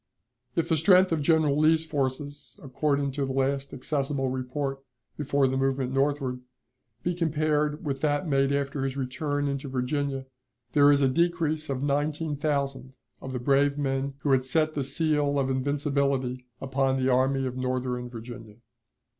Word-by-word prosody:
If 165 - +1
the 160 - +2
strength 185 +3 +5
of 160 -2 +1
General 155 -1 +3
Lee's 160 +1 +4
forces, 145 -2 -4
according 140 +1 0
to 140 +1 -2
the 135 - -3
last 135 +1 0
accessible 135 0 -1
report 135 +2 -3 0.4
before 140 -2 +1
the 130 0 -1
movement 135 -1 0
northward, 135 -2 0 0.6
be 175 - 0
compared 155 -2 0
with 135 -2 -2
that 150 +3 +1
made 135 -1 +2
after 140 -1 -1
his 135 0 -2
return 145 +2 -2
into 140 0 -3
Virginia, 135 +1 -2 0.5
there 145 0 +6
is 140 -1 +3
a - - +5
decrease 160 +1 0
of 135 0 -2
nineteen 150 +2 0
thousand 140 -3 -2 0.3
of 130 - -6
the 130 - -2
brave 140 +3 +2
men 135 -1 -1
who 145 - +1
had 130 -1 +4
set 155 +4 +1
the 145 - -1
seal 145 0 +1
of 135 -1 +1
invincibility 140 -2 -1
upon 135 0 0
the 130 0 0
Army 135 +1 +2
of 125 -1 -3
Northern 125 -1 -2
Virginia. 115 -2 -9
140 Hz, 160 wpm, -27 LUFS, 130-150 Hz, 0.6 s, there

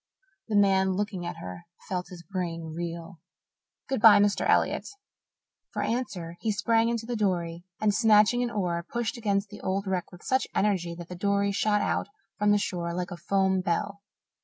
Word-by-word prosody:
The 220 - -1
man 190 -1 +4
looking 190 -3 -3
at 175 - -4
her 130 - -8 0.2
felt 180 -2 -3
his 180 -2 -11
brain 165 -3 -4
reel. 170 0 -6 0.7
"Good 265 -5 -1
bye, 220 -2 +9
Mr. 205 0 +2
Elliott." - - +2 0.9
For - - -1
answer 180 -9 -3
he 220 - 0
sprang 225 +3 +2
into 230 -1 -2
the 240 +1 -3
dory 175 -5 -1
and, 210 -1 +2
snatching 215 +2 +5
an 245 - 0
oar, 180 -6 -1
pushed 235 -1 -2
against 200 -3 -1
the 205 - -10
old 195 +2 -1
wreck 185 -2 -2
with 175 - -14
such 260 0 +1
energy 185 -5 +1
that 170 0 -9
the 180 - -7
dory 200 +2 +1
shot 210 +1 +1
out - - 0 0.3
from 210 0 +3
the 205 - +5
shore 170 -4 -2
like 180 +1 -3
a - - -4
foam 190 +2 +1
bell. 200 +3 -2
195 Hz, 185 wpm, -27 LUFS, 175-210 Hz, 0.9 s, bye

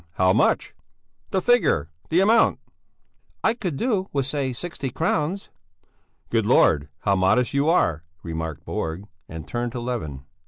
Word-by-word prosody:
How 95 +2 +3
much? - - +2 0.6
The 190 - -1
figure! 165 - +2 0.2
The 175 +3 +3
amount!" 225 +4 +4 0.9
"I 220 - +3
could 185 - -4
do 205 - 0
with, 140 -2 0
say, 140 -1 -1
sixty 140 +1 -5
crowns." 160 +7 -1 0.8
"Good 110 -3 +1
Lord, 75 - +4
how 100 -1 +2
modest 95 +8 +2
you 140 +3 +2
are," 80 - +2 0.2
remarked 80 -2 -5
Borg, 80 +5 -4 0.2
and 80 -1 -8
turned 120 0 -3
to 125 - -4
Levin. 80 - -4
125 Hz, 145 wpm, -24 LUFS, -, 0.9 s, amount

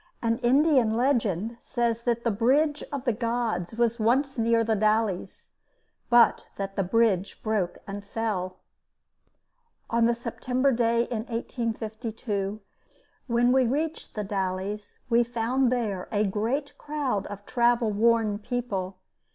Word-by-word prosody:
An 230 0 +1
Indian 255 -3 +3
legend 230 -4 0
says 235 -2 -1
that 235 -1 0
the 235 - +1
Bridge 285 +8 +2
of 280 -3 -4
the 240 - +2
Gods 230 -5 -2
was 235 0 +1
once 265 +5 +2
near 230 -1 +2
The 225 0 +1
Dalles, 215 -2 0 0.6
but 240 -1 +5
that 195 0 -5
the - - +1
bridge 195 -1 +1
broke 210 -5 -1
and 200 0 -6
fell. 200 -4 -3 1.3
On 230 0 +3
the 235 - +2
September 250 +3 0
day 235 -1 +2
in 230 -2 -4
1852 220 -3 -3 0.7
when 240 0 +3
we 260 -1 +4
reached 310 +6 -3
The 210 - -2
Dalles, 195 +1 -3
we 235 0 +4
found 240 +2 0
there 210 -7 -1
a 210 -1 +2
great 230 +8 -1
crowd 275 -9 -2
of 205 0 -9
travel 240 -2 +2
worn 220 -1 +2
people. 205 -6 -3
230 Hz, 135 wpm, -27 LUFS, 210-245 Hz, 1.3 s, but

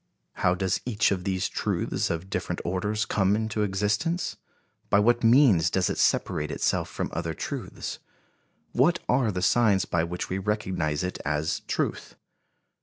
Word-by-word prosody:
How 90 - +2
does 95 +1 -1
each 110 -5 +1
of 95 -2 -2
these 95 -2 0
truths - - -1
of 85 +2 -3
different 95 - -3
orders 105 +4 -1
come 100 -1 +2
into 110 -1 -1
existence? 105 - 0 0.5
By - - +4
what 120 +4 +3
means 115 - +5
does 95 -1 +1
it - - -4
separate 75 -1 +1
itself - - 0
from - - -4
other - - -3
truths? - - -5 0.7
What 160 +8 +3
are 125 -3 +2
the 90 -1 -3
signs 110 -6 +3
by 85 -1 0
which 90 +1 -4
we 95 - -2
recognize 95 -7 -1
it 90 - -3
as 75 +2 -1
truth? - - -2
100 Hz, 155 wpm, -26 LUFS, 90-110 Hz, 0.7 s, means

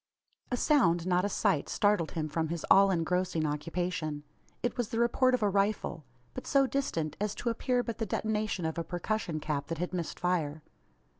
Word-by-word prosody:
A 245 - 0
sound 175 - +3
not 180 +1 +2
a - - 0
sight 150 -6 +1
startled 205 -6 +2
him 155 -2 -2
from 160 +1 -1
his 165 0 -4
all 195 0 +8
engrossing 180 -1 0
occupation. 155 0 -2 0.4
It 245 - 0
was 245 -4 -2
the 225 - -3
report 250 +2 +3
of 235 - -2
a 205 - +4
rifle; 200 -6 0 0.3
but - - -7
so 275 -1 +4
distant, 170 - -2
as 210 0 -1
to 240 - -2
appear 245 +2 0
but 230 -2 -5
the 225 - -1
detonation 215 -3 -1
of 160 +1 -2
a - - -1
percussion 175 -1 -2
cap 145 -2 -2
that 165 - -3
had 180 +3 -3
missed 170 -3 -3
fire. 160 -4 -1
180 Hz, 195 wpm, -30 LUFS, 160-215 Hz, 0.4 s, all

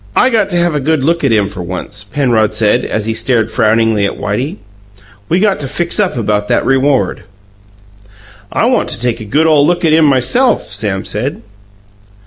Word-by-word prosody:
"I 255 - +3
got 225 -3 +1
to 175 - -3
have 175 -1 +1
a 150 - 0
good 150 0 0
look 170 +3 0
at 135 - +2
him, 105 -3 +2
for 100 -2 -7
once," 95 +4 -6
Penrod 110 -2 0
said, 105 -1 +2
as 110 -1 -2
he 115 - -1
stared 115 -2 0
frowningly 110 -1 +2
at - - -6
Whitey. 125 - -3 0.7
"We 175 - +2
got 205 -1 +1
to 140 - -5
fix 170 +8 -1
up 195 -10 0
about 105 -2 -1
that - - 0
reward." 135 0 +1 1.3
"I - - +1
want - - +1
to - - -1
take 120 -1 -1
a 110 - -8
good 150 +9 +1
ole 155 -3 +4
look 175 +3 +1
at 155 - +3
him 160 0 +4
myself," 145 - +2
Sam 100 -3 -3
said. 125 +8 -3
130 Hz, 195 wpm, -13 LUFS, 110-160 Hz, 1.3 s, ole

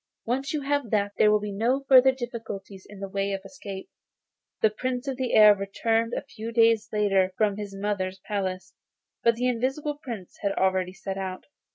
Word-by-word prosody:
Once 265 +4 -1
you 300 - -1
have 285 -3 -1
that, 205 -1 +1
there 215 - +6
will 210 - +4
be 210 0 -5
no 240 +7 0
further 265 0 +7
difficulty 225 -6 -7
in 205 - -11
the 195 - -4
way 195 +1 -2
of 195 - -3
escape.' 200 -6 -8 0.7
The 220 - +4
Prince 250 +4 -3
of 270 - -1
the 255 -1 -2
Air 210 -1 +9
returned 225 +4 0
a - - -3
few 230 -5 -7
days 225 -1 +3
later 195 -3 +2
from 210 -2 +2
his 205 -2 -6
mother's 195 -2 -2
palace, 185 -2 -4 0.5
but 235 0 +4
the 250 +2 0
Invisible 270 +5 -1
Prince 225 - -8
had 200 -1 0
already 185 -1 +1
set 195 0 -5
out. 185 -1 -5
210 Hz, 190 wpm, -26 LUFS, 195-245 Hz, 0.7 s, Air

